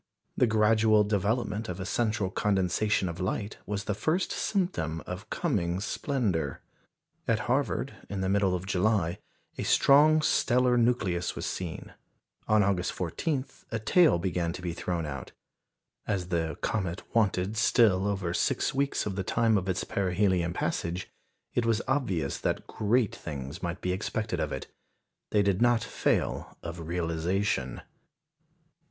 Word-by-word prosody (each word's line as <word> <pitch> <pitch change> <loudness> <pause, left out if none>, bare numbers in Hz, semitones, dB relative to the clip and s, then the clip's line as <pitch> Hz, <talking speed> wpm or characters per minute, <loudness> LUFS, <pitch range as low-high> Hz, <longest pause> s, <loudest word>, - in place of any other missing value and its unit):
The 125 - +3
gradual 110 0 +4
development 105 +1 -1
of 90 +1 -4
a 95 - -4
central 105 -2 0
condensation 100 0 +1
of 85 0 -5
light 100 +3 -2
was 100 -1 -2
the 105 - -1
first 160 - 0
symptom 130 - -1
of - - -7
coming 85 +1 0
splendour. 100 - -1 0.6
At - - +2
Harvard, - - 0 0.2
in 100 -1 -3
the 95 - 0
middle 95 -1 +2
of 90 +1 -4
July, 95 -2 +1 0.4
a - - -1
strong 155 +3 +5
stellar 125 -3 +3
nucleus 110 -8 +1
was - - -4
seen; 90 -3 -5 0.5
on 110 -1 +4
August 95 -2 0
14 130 - -2 0.3
a 115 - 0
tail 150 - +4
began 85 -1 -1
to 90 - -7
be 85 -2 -2
thrown 85 -1 -2
out. 70 -4 -6 0.7
As 95 -4 -1
the 80 -4 -1
comet 95 -5 -2
wanted 105 -2 +1
still 105 -4 +4
over 95 -4 -1
six - - +1
weeks 140 +1 0
of 100 -3 -3
the 95 - -2
time 115 +2 +2
of 95 -1 0
its 90 0 0
perihelion 95 -2 +1
passage, 85 +1 -2 0.4
it 120 - +1
was 115 -1 +1
obvious 90 - 0
that - - -1
great 110 +1 +1
things 70 +1 -6
might 90 0 -4
be 90 - -1
expected 110 +3 -2
of - - -1
it. - - -4 0.6
They 105 -1 +3
did 100 0 +1
not 120 -1 +4
fail - - -1
of 85 -1 -6
realisation. 85 -4 -1
100 Hz, 145 wpm, -29 LUFS, 90-110 Hz, 0.7 s, strong